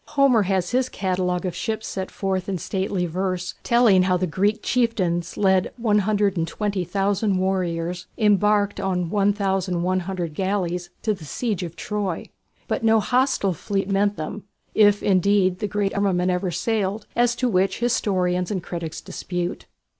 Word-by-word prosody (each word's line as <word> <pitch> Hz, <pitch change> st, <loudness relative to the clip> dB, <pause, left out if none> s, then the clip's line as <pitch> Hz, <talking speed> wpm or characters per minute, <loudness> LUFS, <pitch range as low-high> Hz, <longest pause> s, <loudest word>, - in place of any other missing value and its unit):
Homer 270 Hz, -5 st, +5 dB
has 190 Hz, -1 st, 0 dB
his 255 Hz, +1 st, +1 dB
catalogue 185 Hz, -1 st, -1 dB
of 180 Hz, -2 st, -3 dB
ships 220 Hz, +1 st, -3 dB
set 190 Hz, -1 st, -4 dB
forth 190 Hz, -1 st, -2 dB
in 190 Hz, -, -1 dB
stately 190 Hz, +1 st, -2 dB
verse, 185 Hz, +1 st, -2 dB
telling 235 Hz, -6 st, +4 dB
how 185 Hz, 0 st, +2 dB
the 185 Hz, -, 0 dB
Greek 200 Hz, +6 st, 0 dB
chieftains 185 Hz, -9 st, 0 dB
led 190 Hz, -2 st, +2 dB
120,000 200 Hz, -2 st, 0 dB
warriors 180 Hz, -2 st, -1 dB
embarked 210 Hz, -1 st, +3 dB
on 180 Hz, -3 st, -1 dB
1100 185 Hz, -3 st, 0 dB
galleys 180 Hz, -1 st, -1 dB
to 215 Hz, -, +2 dB
the 190 Hz, -5 st, -10 dB
siege 205 Hz, -, -2 dB
of 170 Hz, -2 st, -6 dB
Troy. 195 Hz, 0 st, -3 dB, 0.4 s
But -, -, -2 dB
no 225 Hz, 0 st, +5 dB
hostile 250 Hz, -4 st, +1 dB
fleet 195 Hz, +4 st, -2 dB
met 200 Hz, +1 st, +2 dB
them, 195 Hz, +7 st, -5 dB, 0.3 s
if 205 Hz, -1 st, +4 dB
indeed 190 Hz, -1 st, +3 dB
the 210 Hz, -, -1 dB
great 205 Hz, 0 st, -1 dB
armament 185 Hz, -3 st, +1 dB
ever 180 Hz, +1 st, -1 dB
sailed, 205 Hz, +2 st, -1 dB
as 240 Hz, 0 st, +3 dB
to 250 Hz, -, 0 dB
which 190 Hz, -3 st, +1 dB
historians 185 Hz, -7 st, 0 dB
and 190 Hz, -5 st, -2 dB
critics 165 Hz, -2 st, -5 dB
dispute. 180 Hz, 0 st, -4 dB
195 Hz, 145 wpm, -23 LUFS, 180-210 Hz, 0.4 s, Homer